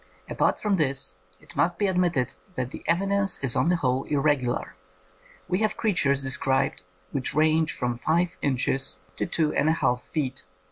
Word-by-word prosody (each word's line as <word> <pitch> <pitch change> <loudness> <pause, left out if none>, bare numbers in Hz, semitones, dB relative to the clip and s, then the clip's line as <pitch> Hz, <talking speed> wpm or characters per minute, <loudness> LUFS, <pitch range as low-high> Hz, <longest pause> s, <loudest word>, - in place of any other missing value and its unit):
Apart - - +1
from 205 -2 +1
this 135 - +1 0.2
it - - -14
must 175 +1 +1
be 205 - +1
admitted 175 -9 +1 0.2
that 125 0 -3
the - - -9
evi 180 +4 +2
dence 200 -1 +2
is 130 -3 +5
on 130 +3 +2
the 175 - +3
whole 135 -5 0
irregular. 140 -7 0 0.7
We 180 +2 0
have 215 0 0
creatures 140 - +1
described 135 0 +1 0.3
which 135 -1 -3
range 155 0 +3
from 125 -3 -2
five 170 +6 0
inches 135 -5 0 0.2
to - - -1
two 155 -2 0
and 155 - +2
a - - +4
half 125 -6 0
feet. 145 -5 -3
150 Hz, 175 wpm, -26 LUFS, 130-175 Hz, 0.7 s, is